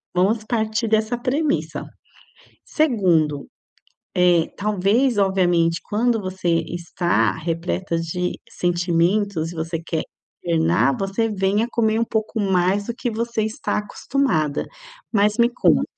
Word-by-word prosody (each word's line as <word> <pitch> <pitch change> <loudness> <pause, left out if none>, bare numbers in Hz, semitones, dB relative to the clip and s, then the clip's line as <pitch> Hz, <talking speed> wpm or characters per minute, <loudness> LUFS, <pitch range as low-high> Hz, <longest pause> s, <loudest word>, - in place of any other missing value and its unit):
vamos 210 +5 +2
partir 220 0 -1
dessa 220 +2 +1
premissa. 285 +5 -1 0.8
Segundo, 175 - +1 0.7
eh, 175 -2 +3
talvez, 210 +4 +1
obviamente, 175 -4 +2
quando 230 +2 +1
você 185 -2 -3 0.2
está 175 0 0
repleta 170 +2 -2
de 180 +2 -3
sentimentos 175 0 0
e - - -10
você 165 0 -3
quer 165 -1 -2 0.4
internar, 165 -4 +2
você 195 +4 -1
vem 200 +1 +1
a 235 - -1
comer 220 -2 +1
um - - +3
pouco 220 +1 -2
mais 195 +1 +1
do 235 - -2
que 245 -1 -2
você 230 0 -2
está 220 -1 -2
acostumada, 205 - -1 0.5
mas 210 +1 +3
me 235 0 +4
conta, 250 - +3
195 Hz, 125 wpm, -22 LUFS, 170-220 Hz, 0.8 s, me